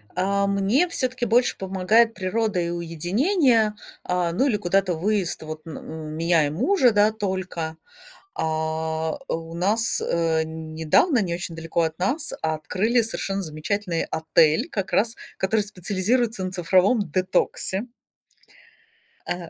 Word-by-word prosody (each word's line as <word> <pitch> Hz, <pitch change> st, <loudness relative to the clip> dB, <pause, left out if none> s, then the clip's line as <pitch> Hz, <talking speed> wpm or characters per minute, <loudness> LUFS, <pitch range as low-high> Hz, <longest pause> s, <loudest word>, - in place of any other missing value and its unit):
А 200 Hz, +2 st, +1 dB
мне 200 Hz, -, +2 dB
всё-таки 255 Hz, -5 st, -2 dB
больше 240 Hz, +2 st, +2 dB
помогает 195 Hz, +5 st, +2 dB
природа 200 Hz, 0 st, -1 dB
и 170 Hz, 0 st, -1 dB
уединение, 210 Hz, -, +1 dB, 0.3 s
а, 180 Hz, -1 st, 0 dB
ну, 260 Hz, +11 st, +1 dB
или 215 Hz, -5 st, +1 dB
куда-то 190 Hz, -1 st, +1 dB
выезд 190 Hz, +1 st, -1 dB
вот 155 Hz, 0 st, -8 dB
на 160 Hz, -, -7 dB
н 155 Hz, -1 st, -7 dB
меня 165 Hz, -2 st, +2 dB
и -, -, -2 dB
мужа, 255 Hz, -, +3 dB
да, 210 Hz, +1 st, +4 dB
только. 185 Hz, -6 st, -4 dB, 0.6 s
А 160 Hz, -, -2 dB
у 165 Hz, 0 st, -4 dB
нас, 215 Hz, +6 st, +1 dB
э, 165 Hz, -1 st, +1 dB
недавно, 160 Hz, -, +1 dB
не 175 Hz, -3 st, -2 dB
очень 170 Hz, -1 st, -5 dB
далеко 165 Hz, +1 st, -1 dB
от 160 Hz, -1 st, -1 dB
нас 280 Hz, -, -1 dB
открыли 185 Hz, +9 st, +1 dB
совершенно 200 Hz, -3 st, -3 dB
замечательный 165 Hz, +2 st, -2 dB
отель, 160 Hz, -1 st, +2 dB
как 190 Hz, -2 st, -3 dB
раз 230 Hz, +2 st, +2 dB, 0.2 s
который 210 Hz, +3 st, +1 dB
специализируется 205 Hz, +3 st, -1 dB
на 185 Hz, -, -4 dB
цифровом 185 Hz, +5 st, +3 dB
детоксе. 190 Hz, +4 st, 0 dB, 1.4 s
Э. 175 Hz, -2 st, -4 dB
185 Hz, 130 wpm, -24 LUFS, 165-220 Hz, 1.4 s, да